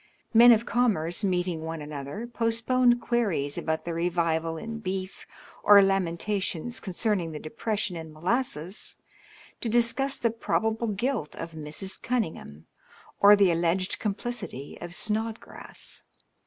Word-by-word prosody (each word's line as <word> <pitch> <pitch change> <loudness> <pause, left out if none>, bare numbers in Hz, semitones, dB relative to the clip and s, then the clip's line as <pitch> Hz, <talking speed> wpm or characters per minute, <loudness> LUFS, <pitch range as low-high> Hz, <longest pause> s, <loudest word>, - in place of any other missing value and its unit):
Men 235 +2 +9
of 230 0 +4
commerce, 210 -8 +1
meeting 180 -3 0
one 160 0 -4
another, 150 +7 -6
postponed 240 +1 +2
queries 200 - 0
about 160 0 -2
the 170 - -3
revival 165 -1 0
in 225 +4 -6
beef 190 -2 -5 0.3
or 205 -1 +8
lamentations 195 +3 -1
concerning 185 -3 -1
the 150 - -5
depression 205 +4 -3
in 160 -1 -7
molasses, 180 - -2 0.6
to 235 - -2
discuss 240 +4 +2
the 230 - +1
probable 225 0 -1
guilt 215 - -2
of 165 - -6
Mrs. 155 +5 -5
Cunningham 165 - -3 0.5
or 205 +1 +9
the 200 -3 +4
allied 170 +3 0
complicity 210 - -4
of 175 - -5
Sno(^rass. 220 +5 -4
195 Hz, 125 wpm, -27 LUFS, 165-230 Hz, 0.6 s, Men